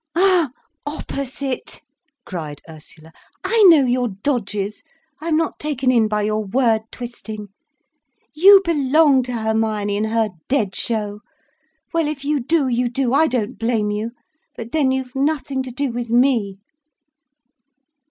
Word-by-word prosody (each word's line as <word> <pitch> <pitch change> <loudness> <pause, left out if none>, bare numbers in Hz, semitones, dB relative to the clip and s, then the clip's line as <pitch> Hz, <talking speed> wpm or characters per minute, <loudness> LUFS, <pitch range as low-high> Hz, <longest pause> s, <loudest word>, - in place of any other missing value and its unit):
"Ah, 360 -4 +4 0.3
opposite!" 275 -2 -5 0.5
cried 155 -6 -6
Ursula. 160 0 -13 0.3
"I 460 -1 +2
know 305 -5 +6
your 250 0 +1
dodges. 205 -2 -3 0.4
I 325 - -6
am 315 -2 +2
not 325 -1 -1
taken 270 -4 0
in 230 -3 +3
by 210 0 -1
your 215 +1 0
word 220 +1 +1
twisting. 220 -4 -8 0.8
You 390 +5 +7
belong 295 -3 +4
to 250 0 -5
Hermione 220 -2 -1
and 215 +1 0
her 225 -1 +1 0.2
dead 220 -8 0
show. 210 -3 -2 0.7
Well, 330 -2 +1
if 290 -2 -5
you 295 0 +1
do, 285 +2 +1
you 245 0 0
do. 250 0 -1
I 315 +3 +4
don't 245 -1 -2
blame 225 -2 0
you. 210 +2 -2 0.5
But 230 0 -7
then 295 -3 +2
you've 260 -1 -2
nothing 280 -1 -1
to 260 -1 -6
do 270 +1 -2
with 240 0 -4
me. 235 -5 +2
245 Hz, 145 wpm, -20 LUFS, 215-280 Hz, 0.8 s, You